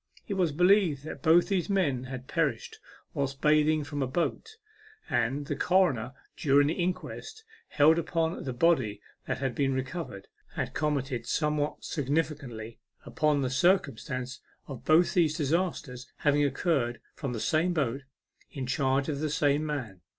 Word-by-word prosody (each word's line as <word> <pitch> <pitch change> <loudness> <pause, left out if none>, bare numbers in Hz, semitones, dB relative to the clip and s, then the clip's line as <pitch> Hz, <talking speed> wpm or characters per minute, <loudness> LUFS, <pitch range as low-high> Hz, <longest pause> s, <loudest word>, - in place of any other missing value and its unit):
It 200 - -2
was 180 -5 +1
believed 175 -3 +3
that 155 - -7
both 170 +1 +5
these 190 -3 0
men 145 -11 +1
had 130 0 -7
perished 460 -2 -1 0.3
whilst 140 -2 -2
bathing 155 0 +3
from 145 0 -4
a 135 - 0
boat, 175 - -2 0.5
and 135 +5 0
the - - -3
coroner, 140 - +2 0.2
during 145 0 +4
the 150 - +1
inquest 185 - -4 0.2
held 160 +2 +4
upon 165 0 -1
the 130 - -3
body 125 -6 +2 0.3
that - - -1
had 135 -2 -2
been 135 0 0
recovered, 130 - -5 0.3
had - - -3
commented 135 -5 -1
somewhat 150 -1 -1
significantly 140 -6 -3 0.3
upon 150 -2 +1
the 130 - -1
circumstance 135 -5 0 0.3
of 135 -4 -9
both 160 +3 +4
these 160 -3 +2
disasters 150 -5 -2
having 145 0 +2
occurred 135 -4 0
from 135 -4 -4
the 115 - -3
same 160 +9 +1
boat, 140 -5 -1 0.5
in 135 -2 -5
charge 135 +1 +1
of 145 -3 -2
the 155 0 -1
same 145 0 +2
man. 130 - -4
145 Hz, 150 wpm, -29 LUFS, 130-165 Hz, 0.5 s, both